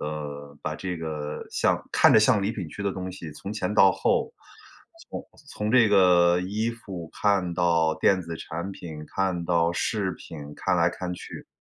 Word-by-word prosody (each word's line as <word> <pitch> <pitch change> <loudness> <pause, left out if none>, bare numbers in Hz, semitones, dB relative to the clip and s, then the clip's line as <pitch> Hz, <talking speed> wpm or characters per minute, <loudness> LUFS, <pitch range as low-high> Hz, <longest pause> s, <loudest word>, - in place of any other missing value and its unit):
呃， 75 -1 -6
把 75 - -3
这 90 +1 -4
个 75 -2 -5
像 - - +1
看 - - +6
着 - - +8
像 110 -3 +4
礼 100 - 0
品 95 -8 -5
区 100 - -7
的 100 - 0
东 95 0 -5
西， 85 -4 -8
从 95 +7 -7
前 105 -1 -2
到 95 -3 +6
后， - - 0 0.8
从 - - -6 0.2
从 105 +1 -3
这 120 -4 +5
个 90 -2 +5
衣 105 +5 -1
服 95 -8 -8
看 100 -4 +2
到 85 -2 +2
电 95 -2 +3
子 85 0 -6
产 85 +5 -5
品， 80 -5 -8
看 95 -3 0
到 85 -1 +2
饰 95 0 -1
品， 80 - -10 0.2
看 - - 0
来 - - +3
看 90 -1 -5
去， - - -9
90 Hz, 195 characters per minute, -26 LUFS, 80-100 Hz, 0.8 s, 着